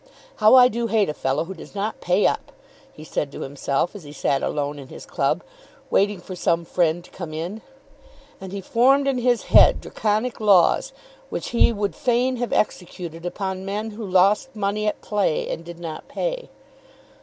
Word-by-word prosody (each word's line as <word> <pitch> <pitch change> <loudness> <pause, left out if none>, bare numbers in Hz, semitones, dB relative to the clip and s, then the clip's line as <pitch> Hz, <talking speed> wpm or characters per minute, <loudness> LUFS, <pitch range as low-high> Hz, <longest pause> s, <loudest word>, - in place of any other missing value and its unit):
"How 215 +4 +6
I 250 -1 +9
do 235 0 -2
hate 220 -5 +2
a - - -1
fellow 135 +1 -1
who 190 - -7
does 185 - -13
not 205 +2 -3
pay 180 +3 +2
up," - - 0 0.4
he 155 - -12
said 150 -2 -3
to - - -8
himself 140 +5 -2
as 200 - -9
he 145 - -10
sat 140 -2 0
alone 145 0 -2
in 135 - -10
his - - -11
club, - - 0 0.5
waiting 205 -1 +2
for 185 +1 -8
some 170 -1 0
friend 170 0 +1
to - - -18
come 165 -4 -7
in. 175 +8 -5 0.8
And 190 -1 -7
he 200 0 -5
formed 270 +7 +3
in 265 -2 +1
his 245 -1 +2
head - - +7
Draconic 220 +3 -1
laws 195 -5 +4 0.4
which - - -4
he 235 - +4
would 205 -2 -2
fain 250 +1 +1
have 245 -1 -3
executed 175 -4 -2
upon 190 0 -4
men 210 +3 -3
who 215 +2 -8
lost 200 +7 +2
money 210 +1 -1
at 210 - -2
play 205 -7 0
and 165 - -5
did 170 0 -9
not 165 -2 -7
pay. - - -3
195 Hz, 190 wpm, -23 LUFS, 170-220 Hz, 0.8 s, I